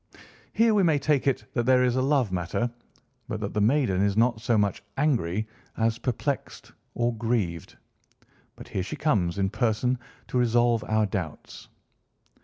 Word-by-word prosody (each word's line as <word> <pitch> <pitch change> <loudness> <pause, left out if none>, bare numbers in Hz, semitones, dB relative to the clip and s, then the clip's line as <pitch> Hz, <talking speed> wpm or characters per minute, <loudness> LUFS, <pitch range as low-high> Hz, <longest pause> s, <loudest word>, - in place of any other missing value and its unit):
Here 230 0 +4
we 205 - +4
may 160 -5 +3
take 140 -1 +1
it 135 - 0
that 120 0 -1
there 130 -1 +5
is 125 -1 +2
a 130 - +1
love 135 -6 +2
matter, 95 +7 -1 0.6
but 110 - -4
that 100 -1 -4
the 105 - 0
maiden 110 -5 +2
is 100 0 +1
not 115 -1 +2
so 115 -1 +2
much 100 -2 0 0.2
angry 110 - 0 0.3
as 115 0 +1
perplexed, 135 +3 -3 0.2
or 120 0 0
grieved. 105 -8 -2 0.8
But - - -11
here 95 - -2
she 95 - -5
comes 100 - 0
in 95 -1 0
person 120 +2 0 0.3
to 125 - 0
resolve 120 -1 +2
our 110 0 +2
doubts." 95 -6 -6
115 Hz, 165 wpm, -26 LUFS, 100-130 Hz, 0.8 s, there